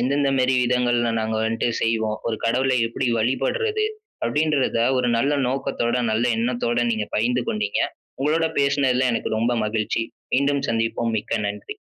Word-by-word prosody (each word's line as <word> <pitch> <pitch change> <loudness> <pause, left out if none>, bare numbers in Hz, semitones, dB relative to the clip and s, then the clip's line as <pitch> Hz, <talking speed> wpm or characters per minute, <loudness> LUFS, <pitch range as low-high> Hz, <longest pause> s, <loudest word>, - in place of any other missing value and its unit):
எந்தெந்த 140 +3 +1
மேரி 130 +1 +3
விதங்கள்ல 120 -1 +1
நாங்க 110 0 -1
வந்துட்டு 115 +1 0
செய்வோம். 110 -1 0
ஒரு 115 - -1
கடவுளை 130 +3 +2
எப்டி 120 +2 -2
வழிபடுறது 135 - 0 0.4
அப்டின்றத, 145 0 +1 0.2
ஒரு 125 -1 +1
நல்ல 135 +5 +1 0.2
நோக்கத்தோட, 130 -2 -1 0.2
நல்ல 110 +2 +1
எண்ணத்தோட 120 0 0
நீங்க 110 -2 -1
பகிர்ந்து 120 +3 +1
கொண்டீங்க. 105 -1 -1 0.4
உங்களோட 155 +4 +2
பேசுனதுல 135 -2 +2
எனக்கு - - -2
ரொம்ப 115 +2 +1
மகிழ்ச்சி 110 +1 -1 0.3
மீண்டும் 140 +1 +1
சந்திப்போம் 115 0 -1
மிக்க - - -2
நன்றி. 105 0 -7
120 Hz, 140 wpm, -23 LUFS, 115-135 Hz, 0.4 s, மேரி